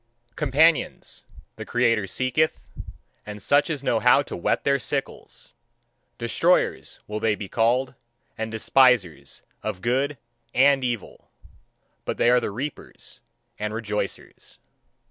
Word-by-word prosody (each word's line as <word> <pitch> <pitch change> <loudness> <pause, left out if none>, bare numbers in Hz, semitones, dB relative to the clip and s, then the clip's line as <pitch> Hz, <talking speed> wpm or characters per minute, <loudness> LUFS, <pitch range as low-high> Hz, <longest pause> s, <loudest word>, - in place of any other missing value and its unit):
Companions, 150 +2 +1 0.3
the - - -6
creator 115 -4 +1
seeketh, 130 - 0 0.6
and 105 0 -8
such 145 - +2
as 145 -4 -3
know 115 -4 +1
how 125 +4 +5
to - - -7
whet 85 - -1
their 140 0 +2
sickles. 115 - -5 0.6
Destroyers, - - 0
will 105 0 -4
they 110 -1 +1
be 105 - -7
called, 120 +5 +1 0.4
and 110 0 -4
despisers 110 - +2 0.2
of 90 - -5
good 135 +4 0 0.4
and 135 +1 +4
evil. 120 -5 -5 0.7
But - - -4
they 120 - +4
are 125 - +5
the - - -3
reapers 130 +8 -7 0.4
and 105 +1 -3
rejoicers. 105 -2 -5
120 Hz, 125 wpm, -24 LUFS, 105-135 Hz, 0.7 s, how